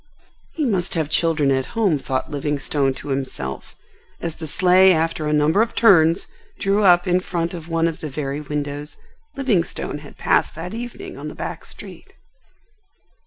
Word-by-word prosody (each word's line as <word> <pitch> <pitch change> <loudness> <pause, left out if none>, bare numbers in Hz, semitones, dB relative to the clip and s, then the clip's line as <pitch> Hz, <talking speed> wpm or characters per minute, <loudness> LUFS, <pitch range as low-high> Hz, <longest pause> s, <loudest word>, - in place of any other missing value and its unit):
He 310 - 0
must 190 -9 0
have 155 -2 -1
children 155 -4 +2
at 130 - -2
home, 195 -10 +3
thought 130 +3 -3
Livingstone 145 -1 0
to - - -8
himself 130 - -4 0.4
as 165 -2 -4
the 160 - -6
sleigh 185 +4 +5
after 160 -1 0
a - - 0
number 150 +6 +3
of 230 - -1
turns 175 -5 +5 0.3
drew 200 +2 +1
up 175 -1 +5
in 180 0 +3
front 170 -2 -3
of 165 -1 -8
one 165 0 +2
of 165 - -4
the 155 - -5
very 140 +1 -3
windows 145 0 -4 0.4
Livingstone 205 - -1
had 145 -1 -13
passed - - +1
that 170 +4 -6
evening 245 - -7
on - - -6
the - - -7
back - - -6
street. - - -9
165 Hz, 165 wpm, -21 LUFS, 145-185 Hz, 0.4 s, sleigh